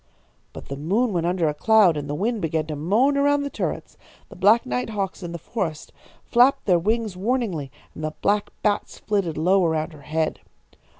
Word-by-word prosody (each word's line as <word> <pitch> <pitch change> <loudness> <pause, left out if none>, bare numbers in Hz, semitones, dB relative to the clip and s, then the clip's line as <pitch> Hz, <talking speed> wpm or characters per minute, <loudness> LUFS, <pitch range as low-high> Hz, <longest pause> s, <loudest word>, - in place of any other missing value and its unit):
"But - - -10
the 140 - -5
moon 205 - 0
went 170 -1 0
under 175 -2 +1
a 150 - 0
cloud 200 +2 +4
and 145 -1 -5
the 145 - -2
wind 215 +6 -1
began 160 -1 -1
to 155 -1 -5
moan 215 - +2
around 285 0 +2
the 280 - -4
turrets. - - -4 0.3
The - - -12
black 210 +5 +4
night 125 - -2
hawks 200 -3 -3
in 175 -2 -6
the 170 - -5
forests 165 -3 -4 0.3
flapped 245 +3 +3
their 180 -4 +4
wings 215 +2 -1
warningly, 195 - -1 0.2
and 155 - -8
the 155 0 -2
black 205 0 +1
bats 205 -1 0
flitted 195 -7 -1
low 185 +4 +3
around 160 0 -1
her 150 - -13
head. 155 +2 -2
185 Hz, 195 wpm, -23 LUFS, 155-220 Hz, 0.3 s, cloud